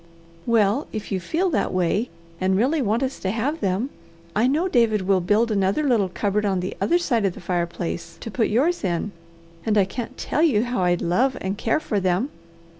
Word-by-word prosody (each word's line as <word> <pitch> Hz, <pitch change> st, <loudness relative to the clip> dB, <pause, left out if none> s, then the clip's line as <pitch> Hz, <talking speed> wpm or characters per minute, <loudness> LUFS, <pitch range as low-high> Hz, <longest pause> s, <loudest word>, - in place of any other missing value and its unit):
"Well 225 Hz, +3 st, +2 dB
if 215 Hz, -1 st, -6 dB
you 190 Hz, -, 0 dB
feel 340 Hz, -, 0 dB
that -, -, 0 dB
way, 185 Hz, +6 st, 0 dB, 0.3 s
and 190 Hz, 0 st, +2 dB
really 275 Hz, +8 st, +2 dB
want 230 Hz, +2 st, +1 dB
us 265 Hz, 0 st, -3 dB
to 190 Hz, -, -2 dB
have 255 Hz, +10 st, -1 dB
them, 200 Hz, +9 st, 0 dB, 0.4 s
I 220 Hz, +4 st, +3 dB
know 310 Hz, +7 st, +1 dB
David 230 Hz, -, +2 dB
will 190 Hz, 0 st, +2 dB
build 215 Hz, +6 st, +2 dB
another 200 Hz, +7 st, +1 dB
little 230 Hz, -9 st, +2 dB
cupboard 205 Hz, +3 st, -1 dB
on 195 Hz, -3 st, +1 dB
the 180 Hz, -, -4 dB
other 345 Hz, -, +3 dB
side 245 Hz, -11 st, 0 dB
of 195 Hz, -3 st, 0 dB
the -, -, -9 dB
fireplace 170 Hz, -1 st, -3 dB
to 225 Hz, -, -6 dB
put 225 Hz, +1 st, +1 dB
yours 295 Hz, +10 st, +1 dB
in, 185 Hz, +2 st, -1 dB, 0.5 s
and 215 Hz, -1 st, +1 dB
I 200 Hz, -, +5 dB
can't 225 Hz, +5 st, -6 dB
tell 300 Hz, -, -1 dB
you 255 Hz, -10 st, +4 dB
how 245 Hz, -4 st, -1 dB
I'd 175 Hz, -1 st, +1 dB
love 250 Hz, +10 st, +1 dB
and 190 Hz, +1 st, -2 dB
care 225 Hz, +7 st, 0 dB
for 215 Hz, -9 st, -1 dB
them." 185 Hz, +9 st, 0 dB
215 Hz, 205 wpm, -23 LUFS, 190-255 Hz, 0.5 s, I